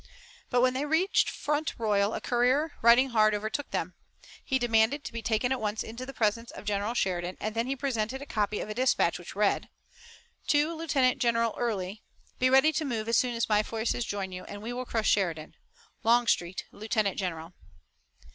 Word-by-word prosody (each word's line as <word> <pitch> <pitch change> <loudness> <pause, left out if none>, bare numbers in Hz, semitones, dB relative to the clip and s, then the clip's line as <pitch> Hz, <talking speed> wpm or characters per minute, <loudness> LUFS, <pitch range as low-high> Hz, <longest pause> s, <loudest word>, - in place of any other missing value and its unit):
But 245 -1 +2
when 255 0 +3
they 265 +2 -1
reached 320 +6 +2
Front 300 +1 -2
Royal 210 -2 +1
a - - -4
courier, 255 +6 +2
riding 240 +3 +6
hard, 215 -3 +3
overtook 220 +7 -3
them. - - -3 0.5
He 265 - +1
demanded 240 +3 +2
to - - -7
be 230 - -4
taken 225 +3 0
at 265 - 0
once 210 0 -1
to 220 - -7
the - - -5
presence 230 -1 0
of - - -10
General 205 +3 -1
Sheridan, 180 -4 -1
and 215 0 -3
then 230 +2 -1
he 270 - -1
presented 260 -2 -2
a 280 - -8
copy 210 -5 -1
of - - -5
a 215 - -4
dispatch 250 -8 +2
which 175 - -10
read: 205 0 +1 0.8
To 295 +3 +2
Lieutenant 275 -6 +1
General 230 -2 +1
Early: 210 -3 -3 0.4
Be 255 - +4
ready 270 +4 +5
to 315 - -1
move 230 -6 -3
as 230 - +3
soon 245 -2 +1
as 230 - 0
my 210 -1 +3
forces 225 +2 -2
join 200 -3 -4
you, 185 0 -7
and 205 +1 -9
we 235 +2 -4
will 250 +1 -4
crush 225 -3 -1
Sheridan. 165 -6 0 0.5
Longstreet, 225 -6 +2
Lieutenant 215 -2 -1
General. 170 -2 -4
230 Hz, 195 wpm, -28 LUFS, 210-255 Hz, 0.8 s, riding